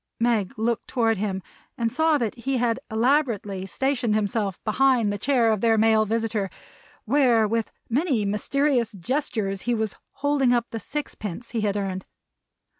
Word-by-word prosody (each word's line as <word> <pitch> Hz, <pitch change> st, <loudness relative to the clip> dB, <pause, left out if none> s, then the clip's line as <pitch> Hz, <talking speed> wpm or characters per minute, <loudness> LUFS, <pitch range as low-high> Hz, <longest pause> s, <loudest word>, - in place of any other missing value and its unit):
Meg 230 Hz, -1 st, +1 dB
looked 230 Hz, +1 st, -1 dB
toward 225 Hz, -4 st, +1 dB
him 190 Hz, -2 st, -2 dB, 0.3 s
and 230 Hz, -1 st, -1 dB
saw 320 Hz, -1 st, +3 dB
that 230 Hz, -6 st, -1 dB
he 260 Hz, +2 st, -2 dB
had 235 Hz, -2 st, +1 dB
elaborately 220 Hz, -6 st, +1 dB
stationed 245 Hz, +3 st, 0 dB
himself 205 Hz, -2 st, -1 dB
behind 235 Hz, -2 st, +3 dB
the -, -, -3 dB
chair 240 Hz, -1 st, +3 dB
of 215 Hz, -3 st, 0 dB
their 225 Hz, -1 st, +3 dB
male 220 Hz, 0 st, +4 dB
visitor, 225 Hz, -2 st, -1 dB, 0.6 s
where 245 Hz, -3 st, +4 dB
with 225 Hz, 0 st, -1 dB, 0.2 s
many 255 Hz, -, +1 dB
mysterious 240 Hz, +3 st, +1 dB
gestures 200 Hz, -, -2 dB
he 240 Hz, -, +3 dB
was 220 Hz, -2 st, -2 dB, 0.2 s
holding 280 Hz, -3 st, +2 dB
up 240 Hz, -1 st, +2 dB
the 225 Hz, -, -4 dB
six 295 Hz, +6 st, -5 dB
pence 210 Hz, +3 st, -7 dB
he 230 Hz, -2 st, -1 dB
had 205 Hz, -1 st, 0 dB
earned. 190 Hz, -2 st, -3 dB
225 Hz, 160 wpm, -25 LUFS, 210-255 Hz, 0.6 s, male